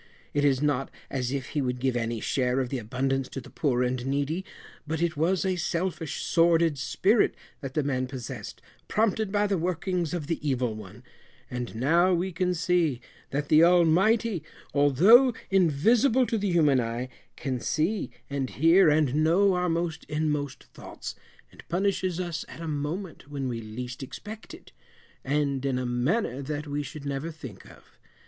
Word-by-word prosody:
It 145 - +1
is 140 -1 +3
not 140 -2 0 0.2
as 125 -2 -2
if 135 -2 -3
he 150 - -1
would 125 -1 -2
give 130 -1 0
any 115 -1 -1
share 125 +2 0
of 130 -2 -1
the 135 - -2
abundance 130 +3 -1
to - - -5
the 125 - -12
poor 125 -4 +1
and 125 0 -1
needy, 140 +6 -1 0.4
but 160 +1 -2
it 170 -1 0
was 175 +5 +1
a 185 -1 0
selfish 170 -2 -2
sordid 165 -3 +3
spirit 195 - +2 0.2
that 135 -1 -7
the 150 - +2
man 130 -2 -1
possessed, 125 -4 -7 0.2
prompted 215 -1 +1
by 205 0 +2
the 200 -3 0
workings 180 -1 -1
of 160 -4 -3
the 165 +2 -2
evil 125 -4 0
one; 105 +2 -11 0.5
and, 125 -2 -4
now 170 +9 +3
we 180 +2 -1
can 180 +1 0
see, 170 -6 +1 0.3
that 145 +1 -2
the 155 +1 +7
Almighty, 180 +4 +4 0.3
although 190 - +6 0.2
invisible 220 - +4
to 230 - -1
the 200 0 0
human 150 -6 +4
eye 120 +1 -2 0.3
can 130 -3 -3
see 170 - -1 0.2
and 140 -2 -2
hear, 165 +5 +5
and 150 -3 +2
know 170 +6 +4
our 180 0 0
most 165 -1 -2
inmost 150 -3 -2
thoughts, - - -8 0.4
and - - -14
punishes 185 -1 0
us 175 -3 -3
at - - -11
a 165 - -5
moment 155 +3 -4
when 140 -2 -3
we 115 -2 -3
least 120 +4 -7
expect 210 - -8
it, - - -17 0.5
and 140 -1 0
in 135 -2 0
a 125 - -2
manner 125 - 0
that 150 +2 -4
we 145 0 -2
should 145 0 -8
never 140 +3 -3
think 135 - -10
of. - - -19
150 Hz, 175 wpm, -27 LUFS, 130-180 Hz, 0.5 s, the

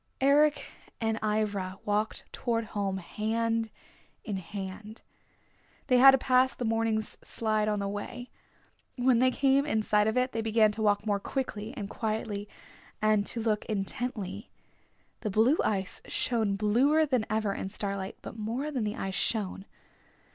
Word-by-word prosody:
Eric 290 +2 +4 0.3
and 225 -1 0
Ivra 205 -3 -1
walked 210 +1 -1
toward 230 -2 -1
home 200 -3 -2
hand 225 +4 -1 0.5
in 205 -5 -3
hand. 195 +3 -7 0.8
They 250 -2 +4
had 270 +2 +10
to 270 - +7
pass 255 -1 +3
the 245 - -3
morning's 225 -1 0
slide 215 -1 0
on 210 -1 +1
the 200 0 -2
way. 240 +5 -6 0.7
When 245 -1 +4
they 255 +1 +5
came 270 +1 +3
in 220 -7 0
sight 210 0 +3
of 220 - 0
it 255 +1 +2
they 225 - -2
began 220 -1 +3
to 215 +1 -5
walk 205 0 +2
more 205 -2 +1
quickly 220 -2 -4
and 205 -4 -4
quietly 215 -2 -3 0.5
and 215 -1 +2
to 230 - -2
look 215 -2 +1
intently. 210 0 -4 0.7
The 215 - -3
blue 225 - +3
ice 195 -3 -1
shone 220 -5 0
bluer 250 +10 +3
than 255 -6 0
ever 215 -2 0
in 190 - -4
starlight, 195 -1 -4
but - - -8
more 235 +7 -3
than 250 -7 -1
the 210 - -2
ice 195 0 -4
shone. 195 -2 -2
220 Hz, 155 wpm, -29 LUFS, 205-245 Hz, 0.8 s, had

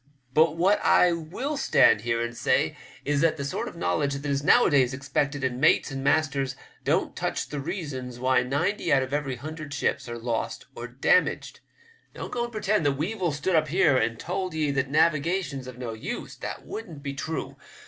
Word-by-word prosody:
But 160 +2 +4
what 190 +5 +3
I 180 - +5
will 180 - -3
stand 110 - +4
here 115 +1 0
and 120 0 -4
say - - +1 0.3
is 145 -1 +1
that 165 -1 +2
the 140 - -4
sort 140 - -3
of - - -8
knowledge 90 +11 0
that 140 +1 -6
is 140 0 0
nowadays 140 - +4
expected 140 +1 -2
in 125 -1 -1
mates - - +3
and 135 0 -4
masters 140 -2 +1 0.3
don't - - 0
touch - - -2
the 145 - -4
reasons 135 -7 -5
why 130 +1 +3
ninety 145 +11 -1
out 135 -1 +4
of 130 +1 -6
every 145 -3 -1
hundred 155 +2 -7
ships 140 - -1
are 120 - -5
lost 115 -1 -3
or - - -7
damaged. - - +1 0.6
Don't - - -6
go 240 - -2
and 240 - -9
pretend 215 -3 0
that 140 - +2
Weevil 175 +4 -1
stood 150 +5 -1
up 155 -1 +3
here 165 -2 +3
and 115 -2 +1
told 185 -1 -3
ye 155 -2 +1
that 135 -1 -1
navigation's 155 -2 +1
of 125 -1 -9
no 120 -3 -5
use. 110 - -6
That - - -7
wouldn't 165 -10 -8
be 140 -1 -3
true. 160 +4 -4
145 Hz, 195 wpm, -26 LUFS, 130-165 Hz, 0.6 s, I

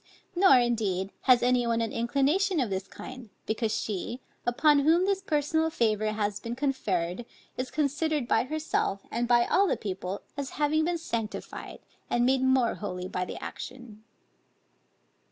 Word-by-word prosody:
Nor 350 -7 +7
indeed, 210 -6 0 0.2
has 245 -1 +7
any 245 -1 +3
one 230 0 +1
an 225 -2 -1
inclination 280 +10 +1
of 240 -7 0
this 190 0 -3
kind; 255 -3 -10 0.2
because 220 0 -1
she, 215 +4 -3 0.3
upon 290 +4 +4
whom 325 +6 +4
this 390 -1 +1
personal 320 -1 +1
favor 215 -6 +1
has 205 -1 -1
been 230 +2 -5
conferred, 230 -9 -1 0.3
is 255 0 -3
considered 300 -1 0
by 225 +1 +2
herself, 300 -9 -1
and 240 +1 -1
by 240 0 +4
all 395 +2 +3
the - - +1
people, 190 -1 -5
as 280 -1 -4
having 305 +1 +2
been 345 0 0
sanctified 230 -9 -5 0.3
and 240 0 +2
made 260 +1 +3
more 260 -2 +3
holy 180 -3 -5
by 180 -1 -2
the - - -7
action. 240 -4 -8
245 Hz, 155 wpm, -28 LUFS, 215-295 Hz, 0.3 s, Nor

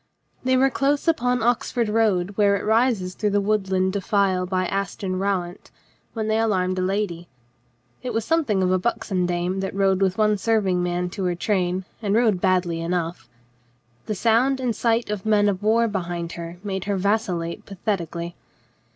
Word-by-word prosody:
They 260 0 +3
were 270 +1 +3
close 280 +4 0
upon 250 -6 +2
the 225 - -2
Oxford 240 -1 +1
road 210 -4 +1
where 200 -1 +4
it 200 - -3
rises 220 -4 +2
through 210 +3 -1
the 205 0 +2
woodland 190 -2 0
defile 195 -2 +1
by 185 0 0
Aston 195 -1 -2
Rowant 190 -2 -2 0.4
when 220 -2 -3
they 220 0 +1
alarmed 185 -4 +1
a - - 0
lady. 185 -3 -2 0.7
It 250 0 -4
was 225 -1 -1
something 270 - +1
of 185 - +2
a 185 - +2
buxom 195 -4 -1
dame 175 +2 -1
that 190 0 -3
rode 195 -1 +2
with 190 -1 +1
one 210 -1 +2
serving 195 -5 +1
man 175 0 -1
to 190 0 -3
her 175 -1 0
train, 185 -1 -1 0.2
and 205 -2 0
rode 220 -6 +3
badly 180 -3 +1
enough. 170 -4 -3 0.8
The 215 - -1
sound 240 +6 +2
.and 255 -1 -1
the - - +1
sight 230 0 0
of 205 -3 -3
men 210 -1 +3
of 195 -1 0
war 225 +2 +3
behind 175 -4 -3
her 170 0 -7
made 190 -2 -3
her 200 -1 0
vacillate 185 -4 -1
pathetically. 175 -4 -3
195 Hz, 180 wpm, -23 LUFS, 180-220 Hz, 0.8 s, where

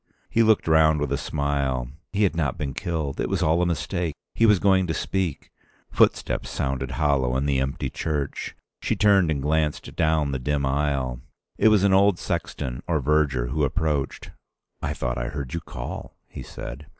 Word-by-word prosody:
He 115 - +3
looked 110 -5 +3
round 80 -1 +5
with 75 -2 -2
a - - +2
smile. 70 -4 -1 0.2
He 100 +1 +1
had 90 -6 +2
not 75 -6 -1
been 70 -3 -3
killed. 80 -5 -3
It - - -1
was - - 0
all 80 +3 +3
a 90 - +2
mistake. 85 -1 -2 0.2
He 115 - +4
was 105 -2 +6
going 95 -1 +3
to 80 - -1
speak.... 95 -7 -2 0.4
Footsteps 65 - +2
sounded 65 +1 -2
hollow 65 -4 +2
in 70 - -1
the 70 -2 +1
empty 65 +1 -2
church. 75 -3 -3 0.3
She - - 0
turned 100 -5 +4
and 70 -3 -1
glanced 75 0 -1
down 80 -2 +1
the 65 - -2
dim 70 +2 0
aisle. 65 -3 -1 0.4
It - - +5
was 105 -3 +5
an 100 -1 +4
old 100 -1 +5
sexton 70 -7 -3
or 85 -3 +1
verger 70 -4 +1
who 75 +3 0
approached. 75 -1 -1 0.5
"I - - -2
thought 60 0 -2
I - - -2
heard 70 -2 -5
you 85 - -1
call," - - -7
he - - -9
said. 70 +5 -8
75 Hz, 185 wpm, -24 LUFS, 65-85 Hz, 0.5 s, was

